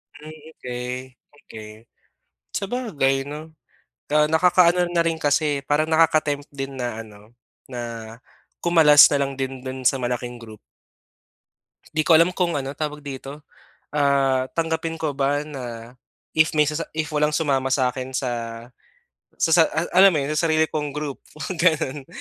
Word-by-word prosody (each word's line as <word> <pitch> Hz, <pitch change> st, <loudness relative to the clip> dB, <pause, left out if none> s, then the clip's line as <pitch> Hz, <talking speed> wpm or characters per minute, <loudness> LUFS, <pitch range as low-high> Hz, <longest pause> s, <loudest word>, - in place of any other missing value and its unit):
Hmm, 150 Hz, +2 st, -11 dB, 0.2 s
okey. 125 Hz, +1 st, -6 dB, 0.2 s
Okey. 110 Hz, -6 st, -12 dB, 0.9 s
Sabagay 190 Hz, -, -1 dB
'no, 155 Hz, +2 st, -8 dB, 0.6 s
ah, 150 Hz, 0 st, +4 dB
nakakaano 175 Hz, +2 st, +4 dB
na 170 Hz, -1 st, +3 dB
rin, 165 Hz, -1 st, 0 dB
kasi 145 Hz, -2 st, 0 dB
parang 150 Hz, +3 st, +1 dB
naka-tempt 155 Hz, -3 st, +2 dB
din 135 Hz, -1 st, -6 dB
na 120 Hz, -3 st, -4 dB
ano, 105 Hz, 0 st, -14 dB, 0.4 s
na 125 Hz, -2 st, -6 dB, 0.8 s
kumalas 160 Hz, -4 st, +7 dB
na 145 Hz, -1 st, +1 dB
lang 135 Hz, -, -4 dB
din 135 Hz, -1 st, -4 dB
do'n 130 Hz, 0 st, -6 dB
sa 135 Hz, -, 0 dB
malaking 120 Hz, 0 st, -3 dB
group. 110 Hz, -3 st, -12 dB, 1.4 s
Di 155 Hz, -, +2 dB
ko 165 Hz, +1 st, +5 dB
alam 170 Hz, +2 st, +4 dB
kung 175 Hz, -3 st, 0 dB
ano, 135 Hz, 0 st, -4 dB
tawag 150 Hz, 0 st, -4 dB
dito, 140 Hz, +1 st, -8 dB, 0.5 s
ah, 135 Hz, -3 st, +2 dB
tanggapin 165 Hz, 0 st, -2 dB
ko 150 Hz, -3 st, -2 dB
ba 140 Hz, +1 st, +1 dB
na 125 Hz, -5 st, -8 dB, 0.4 s
if 160 Hz, 0 st, +3 dB
may 150 Hz, -1 st, +3 dB
sasa 155 Hz, +2 st, -3 dB
if 155 Hz, 0 st, -2 dB
walang 150 Hz, 0 st, +1 dB
sumama 135 Hz, -4 st, 0 dB
sa 130 Hz, -2 st, +2 dB
akin 130 Hz, +1 st, -7 dB
sa 130 Hz, -1 st, -1 dB, 1.1 s
sa -, -, +1 dB
sa 165 Hz, 0 st, +7 dB
a 165 Hz, +3 st, -3 dB
alam 190 Hz, 0 st, +6 dB
mo -, -, +1 dB
'yon, 140 Hz, -, -3 dB
sa 160 Hz, +2 st, +1 dB
sarili 160 Hz, 0 st, +3 dB
kong 150 Hz, -2 st, -3 dB
group, 150 Hz, -2 st, -4 dB, 0.4 s
ganun. 150 Hz, -5 st, +1 dB
145 Hz, 150 wpm, -22 LUFS, 130-160 Hz, 1.4 s, kumalas